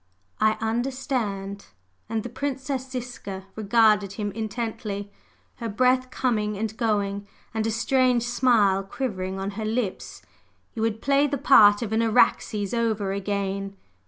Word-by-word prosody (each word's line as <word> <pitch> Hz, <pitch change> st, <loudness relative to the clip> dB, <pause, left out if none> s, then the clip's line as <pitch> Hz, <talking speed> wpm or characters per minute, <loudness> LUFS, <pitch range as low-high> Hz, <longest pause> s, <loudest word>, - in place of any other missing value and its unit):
"I 215 Hz, 0 st, +4 dB
understand!" 225 Hz, -4 st, -2 dB, 0.4 s
and 220 Hz, -1 st, -1 dB
the 245 Hz, -, -5 dB
Princess 265 Hz, +1 st, -3 dB
Ziska 240 Hz, -7 st, -6 dB
regarded 210 Hz, -2 st, +3 dB
him 205 Hz, 0 st, -3 dB
intently, 215 Hz, -2 st, -4 dB, 0.5 s
her 230 Hz, -2 st, -4 dB
breath 255 Hz, +4 st, +2 dB
coming 215 Hz, -6 st, -1 dB
and 220 Hz, +1 st, -3 dB
going, 205 Hz, -3 st, -1 dB, 0.3 s
and 220 Hz, 0 st, -1 dB
a -, -, +1 dB
strange 245 Hz, +1 st, +2 dB
smile 235 Hz, -6 st, +3 dB
quivering 195 Hz, -3 st, -4 dB
on 195 Hz, +1 st, -3 dB
her 215 Hz, +2 st, -5 dB
lips. 220 Hz, -3 st, -3 dB, 0.5 s
"You 225 Hz, -, -4 dB
would 225 Hz, 0 st, -1 dB
play 280 Hz, +1 st, +3 dB
the 285 Hz, 0 st, -2 dB
part 210 Hz, -5 st, +6 dB
of 220 Hz, -1 st, -4 dB
an 225 Hz, -, +2 dB
Araxes 215 Hz, -3 st, +2 dB
over 220 Hz, -4 st, 0 dB
again!" 195 Hz, 0 st, -3 dB
220 Hz, 135 wpm, -25 LUFS, 200-245 Hz, 0.5 s, part